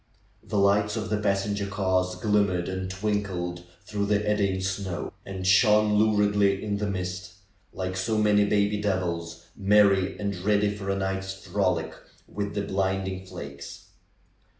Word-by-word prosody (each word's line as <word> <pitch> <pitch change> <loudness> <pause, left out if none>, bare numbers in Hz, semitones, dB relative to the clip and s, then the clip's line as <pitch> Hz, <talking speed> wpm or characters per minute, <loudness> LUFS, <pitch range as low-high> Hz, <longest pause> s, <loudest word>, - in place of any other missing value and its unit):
The 105 - -4
lights 100 +1 +3
of - - -4
the 105 - +1
passenger 100 0 0
cars 95 -2 0
glimmered 100 -3 +1
and 95 0 -3
twinkled 95 -3 -3 0.2
through 105 -1 -2
the 105 0 +1
eddying 100 -2 +1
snow, 95 -2 -3
and 95 -1 -5
shone 105 +2 +5
luridly 105 -2 +3
in 105 -1 -1
the 105 0 -2
mist, 90 -1 -4 0.4
like 95 0 -4
so 100 +4 -1
many 105 -1 +4
baby 105 0 +1
devils, 85 -4 -2
merry 100 -1 +3
and 100 -1 -2
ready 105 +2 +1
for 100 -1 -6
a 100 - +1
night's 95 0 -2
frolic 90 -1 0 0.3
with 100 0 -4
the 100 - -1
blinding 95 -1 -2
flakes. 70 -6 -9
100 Hz, 145 wpm, -26 LUFS, 95-105 Hz, 0.4 s, shone